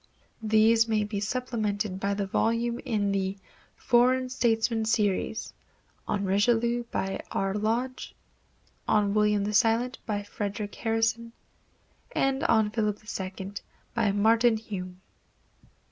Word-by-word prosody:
These 220 Hz, +1 st, +4 dB
may 215 Hz, -2 st, +1 dB
be 205 Hz, -1 st, -3 dB
supplemented 215 Hz, -3 st, -2 dB
by 200 Hz, +1 st, -1 dB
the 200 Hz, 0 st, -1 dB
volumes 230 Hz, +4 st, 0 dB
in 210 Hz, -5 st, 0 dB
the 195 Hz, 0 st, -1 dB, 0.4 s
"Foreign 255 Hz, +1 st, +3 dB
Statesmen 230 Hz, -2 st, +1 dB
Series," 215 Hz, -1 st, 0 dB, 0.5 s
on 200 Hz, -1 st, -1 dB
Richelieu, 235 Hz, +4 st, +2 dB
by 195 Hz, -4 st, -3 dB
R. 195 Hz, 0 st, -1 dB
Lodge; 230 Hz, +5 st, -2 dB, 0.7 s
on 205 Hz, -2 st, +2 dB
William 210 Hz, -1 st, +2 dB
the 210 Hz, +1 st, -2 dB
Silent, 230 Hz, +4 st, +2 dB
by 205 Hz, -2 st, -2 dB
Frederic 205 Hz, 0 st, -4 dB
Harrison, 225 Hz, +1 st, -1 dB, 0.8 s
and 270 Hz, 0 st, +1 dB
on 220 Hz, -2 st, +3 dB
Philip 210 Hz, -2 st, -1 dB, 0.2 s
II, 190 Hz, +1 st, -6 dB, 0.4 s
by 230 Hz, -4 st, +2 dB
Martin 225 Hz, +3 st, +3 dB
Hume. 185 Hz, -4 st, -7 dB
220 Hz, 115 wpm, -27 LUFS, 205-230 Hz, 0.8 s, These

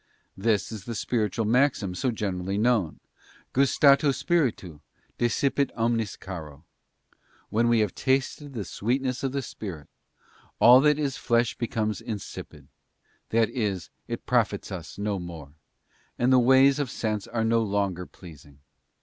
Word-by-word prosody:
This 105 Hz, 0 st, 0 dB
is 105 Hz, -4 st, -7 dB
the 115 Hz, -, -5 dB
spiritual 110 Hz, +1 st, -1 dB
maxim 120 Hz, -4 st, +2 dB
so 130 Hz, +8 st, -1 dB
generally 100 Hz, -4 st, -2 dB
known: 110 Hz, -7 st, +1 dB, 0.5 s
Gustato 140 Hz, +1 st, +4 dB
Spiritu, 130 Hz, -, -1 dB, 0.4 s
desipit 135 Hz, +3 st, +1 dB
omnis 115 Hz, -2 st, 0 dB
caro. 80 Hz, -5 st, -9 dB, 0.9 s
When 115 Hz, +3 st, +2 dB
we 120 Hz, -1 st, +4 dB
have 105 Hz, -4 st, 0 dB
tasted 135 Hz, +2 st, -1 dB
the 105 Hz, -4 st, -3 dB
sweetness 125 Hz, +7 st, -2 dB
of 135 Hz, -, -1 dB
the 140 Hz, 0 st, -2 dB
Spirit, 95 Hz, -10 st, -8 dB, 0.7 s
all 125 Hz, +2 st, +8 dB
that 150 Hz, 0 st, +4 dB
is 140 Hz, -4 st, -2 dB
flesh 120 Hz, -1 st, +1 dB
becomes 110 Hz, -4 st, -2 dB
insipid; 105 Hz, -4 st, -8 dB, 0.6 s
that 115 Hz, -1 st, +2 dB
is, 100 Hz, -8 st, -3 dB, 0.2 s
it -, -, -5 dB
profits -, -, 0 dB
us -, -, -7 dB
no 100 Hz, -1 st, -2 dB
more, 80 Hz, -5 st, -9 dB, 0.6 s
and 125 Hz, +2 st, +3 dB
the 130 Hz, -, +7 dB
ways 135 Hz, +3 st, +5 dB
of 140 Hz, -4 st, -1 dB
sense 110 Hz, -4 st, -3 dB
are 115 Hz, -1 st, -1 dB
no 115 Hz, 0 st, +3 dB
longer 100 Hz, -4 st, -1 dB
pleasing. 75 Hz, -5 st, -14 dB
115 Hz, 140 wpm, -26 LUFS, 100-130 Hz, 0.9 s, all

